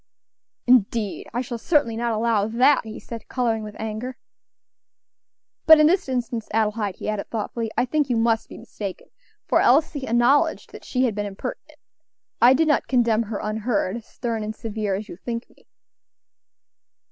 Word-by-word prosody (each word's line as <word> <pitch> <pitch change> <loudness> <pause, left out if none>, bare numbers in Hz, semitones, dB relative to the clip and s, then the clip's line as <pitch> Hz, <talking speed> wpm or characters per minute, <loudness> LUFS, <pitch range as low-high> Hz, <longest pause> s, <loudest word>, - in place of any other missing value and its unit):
"Indeed! 230 -4 +2
I 240 - -1
shall 240 -2 -5
certainly 260 -4 +1
not 235 +1 -1
allow 220 -2 +1
that" 250 +5 +3
he 220 0 -7
said, 230 -1 -9
coloring 235 -3 0
with 210 -1 -8
anger. 220 +4 -5 1.5
"But 315 -1 +9
in 305 - +6
this 340 -2 +2
instance, 240 -3 -2
Adelaide," 215 -2 0
he - - -7
added 215 -1 -3
thoughtfully, 225 0 -3
"I 245 - +3
think 290 +1 0
you 240 - +1
must 225 0 +1
be - - -10
mistaken, 200 -3 -8 0.4
for - - +3
Elsie 285 +1 +2
acknowledged 240 +5 +2
that - - -12
she 255 0 0
had 240 -4 +1
been 205 0 -3
impertinent. 195 0 -7 0.6
I 250 +2 +7
did 320 +3 +2
not 300 - +2
condemn 235 -3 +2
her 210 - -3
unheard, 215 0 -1
stern 230 -1 -4
and 215 +1 -5
severe 215 -3 -3
as 205 +2 -5
you 170 - -9
think 230 +3 -5
me." - - -26
230 Hz, 165 wpm, -23 LUFS, 215-250 Hz, 1.5 s, But